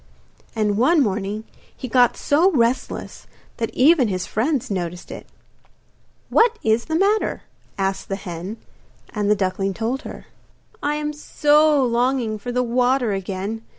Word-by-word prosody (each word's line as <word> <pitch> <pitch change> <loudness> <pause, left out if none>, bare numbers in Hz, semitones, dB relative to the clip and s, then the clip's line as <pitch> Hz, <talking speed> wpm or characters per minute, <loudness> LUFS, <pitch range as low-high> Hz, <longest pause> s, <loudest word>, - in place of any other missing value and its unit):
And 210 -2 0
one 315 +7 +4
morning 210 -3 -1 0.3
he 255 - -6
got 245 0 +3
so 320 +6 +3
restless 240 -1 -1 0.3
that 225 -2 -2
even 280 -1 +5
his 185 -3 -2
friends 260 +2 -1
noticed 175 -2 -4
it. - - -9 1.0
'What 465 0 +4
is 220 +1 +2
the 315 - -2
matter?' 405 +5 +1 0.3
asked 195 0 -2
the 195 - -1
hen; 185 +2 -7 0.6
and 210 -3 -1
the 210 - +5
duckling 195 0 -1
told 235 +4 -2
her. - - -9 0.6
'I 295 +1 0
am 300 0 -3
so 295 -1 +3
longing 240 -2 0
for 245 +4 -5
the 250 +1 +1
water 245 0 +1
again. 195 +3 -4
235 Hz, 145 wpm, -21 LUFS, 200-275 Hz, 1.0 s, even